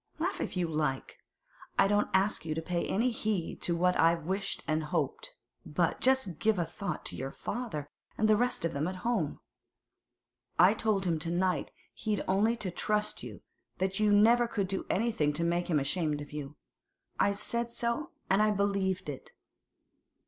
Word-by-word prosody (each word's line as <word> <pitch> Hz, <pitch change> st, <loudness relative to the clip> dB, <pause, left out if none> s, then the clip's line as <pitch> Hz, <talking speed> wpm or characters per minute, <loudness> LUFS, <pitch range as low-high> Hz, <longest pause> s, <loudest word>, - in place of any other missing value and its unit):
Laugh 345 Hz, +5 st, -2 dB
if -, -, -3 dB
you 175 Hz, -2 st, +1 dB
like! 150 Hz, -4 st, -2 dB, 0.6 s
I -, -, +5 dB
don't 205 Hz, +1 st, +2 dB
ask 195 Hz, 0 st, +2 dB
you 155 Hz, -1 st, -3 dB
to 160 Hz, -, -2 dB
pay 175 Hz, 0 st, -1 dB
any 235 Hz, +5 st, +1 dB
heed 210 Hz, -6 st, -2 dB
to 170 Hz, -, +1 dB
what 180 Hz, +1 st, +2 dB
I've 165 Hz, -1 st, +3 dB
wished 195 Hz, +3 st, -2 dB
and 155 Hz, 0 st, 0 dB
hoped; -, -, -2 dB, 0.3 s
but -, -, 0 dB
just 260 Hz, -11 st, +2 dB
give 220 Hz, -2 st, +2 dB
a 175 Hz, -, +1 dB
thought 175 Hz, +3 st, -5 dB
to -, -, -4 dB
your 135 Hz, -, -4 dB
father, 155 Hz, -, -4 dB, 0.3 s
and 215 Hz, -, +3 dB
the 215 Hz, -, +6 dB
rest 245 Hz, -5 st, +1 dB
of 165 Hz, -, -1 dB
them 145 Hz, +3 st, -1 dB
at 185 Hz, -, -3 dB
home. 220 Hz, -11 st, 0 dB, 1.2 s
I 180 Hz, +4 st, +7 dB
told 215 Hz, -3 st, 0 dB
him 165 Hz, -3 st, +1 dB
to 165 Hz, -, -3 dB
night 180 Hz, +1 st, 0 dB, 0.2 s
he'd 210 Hz, -2 st, -2 dB
only 215 Hz, +5 st, +2 dB
to 195 Hz, -5 st, -2 dB
trust 210 Hz, +4 st, 0 dB
you, -, -, -9 dB, 0.4 s
that 190 Hz, +1 st, -1 dB
you 210 Hz, -1 st, +4 dB
never 230 Hz, +4 st, +5 dB
could 200 Hz, -4 st, -1 dB
do 195 Hz, 0 st, -3 dB
anything 190 Hz, -9 st, +1 dB
to 165 Hz, +3 st, -1 dB
make 175 Hz, +1 st, 0 dB
him 155 Hz, -4 st, +3 dB
ashamed 150 Hz, +1 st, 0 dB
of 145 Hz, -, -8 dB
you. 150 Hz, -1 st, -6 dB, 0.6 s
I 200 Hz, -, +4 dB
said 235 Hz, +3 st, -1 dB
so, 235 Hz, +7 st, -1 dB, 0.2 s
and 195 Hz, +2 st, +3 dB
I 215 Hz, -, +4 dB
believe 200 Hz, -3 st, 0 dB
it. 145 Hz, -3 st, -7 dB
190 Hz, 185 wpm, -31 LUFS, 165-215 Hz, 1.2 s, I